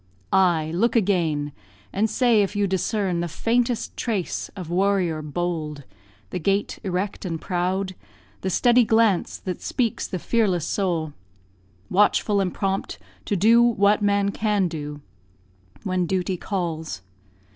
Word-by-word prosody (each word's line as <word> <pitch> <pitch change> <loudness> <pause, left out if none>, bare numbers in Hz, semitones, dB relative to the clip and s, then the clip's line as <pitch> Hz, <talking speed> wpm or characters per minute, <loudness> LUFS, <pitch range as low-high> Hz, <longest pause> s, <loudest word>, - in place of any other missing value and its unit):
Ay! 170 -5 +3
look 230 +9 +1
again, 170 -9 +1 0.4
And 215 +3 +1
say 230 -1 +3
if 200 +1 -1
you 205 0 +2
discern 190 -1 0
the 175 - -1
faintest 235 +7 0
trace 210 -7 -2
Of 180 -4 -7
warrior 185 -4 +1
bold; 155 -2 -3 0.5
the - - -2
gait 195 +4 0
erect 190 +1 -2
and 165 -4 -3
proud, 185 +2 -1 0.5
The 190 - -1
steady 245 +6 +4
glance 220 -4 +2
that 185 -2 -5
speaks 240 -5 -1
the 185 - -3
fearless 185 -4 +1
soul, 170 -7 -1 0.8
Watchful 205 +1 +3
and 185 -2 0
prompt 195 0 -2 0.3
to 205 - 0
do 225 +5 +5
what 210 -3 +3
man 200 -1 +2
can 210 -3 +1
do 150 -3 -6 0.8
When 185 -2 0
duty 185 0 0
calls. 165 - -4
190 Hz, 135 wpm, -24 LUFS, 175-205 Hz, 0.8 s, do